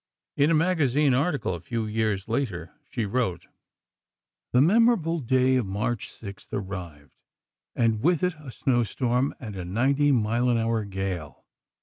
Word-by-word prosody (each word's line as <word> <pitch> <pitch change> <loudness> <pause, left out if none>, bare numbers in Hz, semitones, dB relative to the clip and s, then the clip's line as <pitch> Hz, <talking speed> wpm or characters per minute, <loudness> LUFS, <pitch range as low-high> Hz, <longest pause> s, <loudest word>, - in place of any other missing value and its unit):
In 145 +2 +3
a 165 - +4
magazine 150 -5 +2
article, 140 - 0
a 85 - -5
few 110 +6 -3
years 110 -2 -1
later, 110 -8 -2 0.2
she 115 -4 -2
wrote: 100 -6 -1 1.1
The 125 - +4
memorable 180 - +3
day 130 0 +2
of 120 -6 -1
March 105 +3 -2
6th 100 -3 -10
arrived, 90 -7 -6 0.6
and 115 -2 +1
with 175 +3 +2
it 180 0 +2
a 145 -3 -10
snow 120 0 +1
storm 125 +3 0
and 110 -6 -7
a 95 - -5
ninety 135 +10 +2
mile 120 0 +1
an 120 - +3
hour 115 -1 0
gale. 95 -6 -5
120 Hz, 150 wpm, -26 LUFS, 100-140 Hz, 1.1 s, a